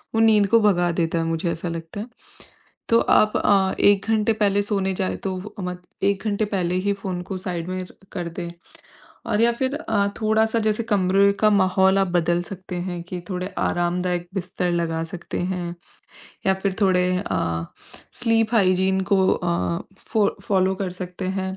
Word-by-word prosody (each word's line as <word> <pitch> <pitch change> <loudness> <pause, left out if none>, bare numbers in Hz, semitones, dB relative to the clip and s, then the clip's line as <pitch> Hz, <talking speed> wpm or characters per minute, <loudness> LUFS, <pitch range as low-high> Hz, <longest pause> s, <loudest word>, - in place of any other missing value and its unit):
वो - - +2
नींद 215 -2 +5
को 230 +3 +5
भगा 175 -4 +3
देता 165 0 0
है - - 0
मुझे 165 +1 -1
ऐसा 170 +1 -4
लगता 165 +3 -6
है। 220 - -6 0.8
तो 230 - +5
आप 215 0 +3
अ, 195 -2 +3
1 200 -1 +4
घंटे 220 0 +2
पहले 205 -2 +2
सोने 195 -2 0
जाएँ 185 0 -1
तो 190 -1 -2 0.2
मत 180 -1 -5 0.2
1 200 0 +1
घंटे 210 +1 +1
पहले 180 -4 -1
ही 200 - +3
फोन 190 -2 -4
को 190 +1 -5
साइड 175 -2 -4
में 185 0 -3
र - - -18 0.2
कर 175 -2 -3
दें 170 0 -6 0.8
और 215 -1 +1
या 235 +1 +5
फिर 260 +3 -1
अ, 220 -9 0
थोड़ा-सा 220 +1 +2
जैसे 215 +1 0
कमरे 200 -2 +3
का 215 - +6
माहौल 190 -1 +3
आप 195 - +2
बदल 175 0 +1
सकते 185 0 -8
हैं 175 -2 -4
कि 180 - -4
थोड़े 185 -1 -3
आरामदायक 175 0 0
बिस्तर 180 -1 -2
लगा 165 -1 -1
सकते 170 +1 -6
हैं 175 -1 -3 0.7
या 190 - +4
फिर 195 -2 0
थोड़े 180 -2 +3
अ, 85 - -2 0.6
स्लीप 225 -1 +2
हाइजीन 190 -2 +3
को 190 -1 +4
अ, 170 -1 0 0.2
फॉ 215 -3 +1
फॉलो 190 -1 +2
कर 190 -1 -3
सकते 180 +1 -5
हैं, 190 0 -3
190 Hz, 180 wpm, -23 LUFS, 175-205 Hz, 0.8 s, का